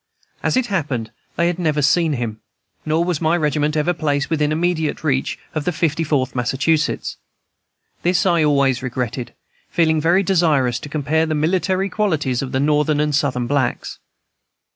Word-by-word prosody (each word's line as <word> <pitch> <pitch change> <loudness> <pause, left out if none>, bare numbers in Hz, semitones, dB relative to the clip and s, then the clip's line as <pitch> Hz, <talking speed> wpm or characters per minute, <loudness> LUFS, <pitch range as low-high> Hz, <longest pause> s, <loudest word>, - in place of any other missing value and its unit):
As - - +1
it 255 - +2
happened, 145 - -2 0.2
they 170 - +1
had 175 +1 0
never 155 -4 +1
seen 160 +3 +3
him, 115 -4 -3 0.5
nor 160 +2 +2
was 175 -3 -1
my 165 +2 +2
regiment 150 -1 0
ever 155 +4 +1
placed 145 -3 -1
within 150 -2 +1
immediate 160 -1 -1
reach 135 -4 0 0.2
of 155 - -2
the 180 - 0
Fifty 165 -2 0
Fourth 140 -4 0
Massachusetts. 135 +5 0 0.8
This 175 +1 +1
I 170 -3 +3
always 140 -4 +2
regretted, 125 -1 -4 0.3
feeling 160 -2 +2
very 175 +5 +3
desirous 155 -10 +2
to 145 - -9
compare 155 +2 0
the 155 - -1
military 185 +5 +1
qualities 160 - 0
of 135 -1 -5
the 130 - 0
Northern 150 +1 +2
and 150 0 +1
Southern 135 -3 0
blacks. 130 -1 -1
150 Hz, 165 wpm, -20 LUFS, 140-170 Hz, 0.8 s, seen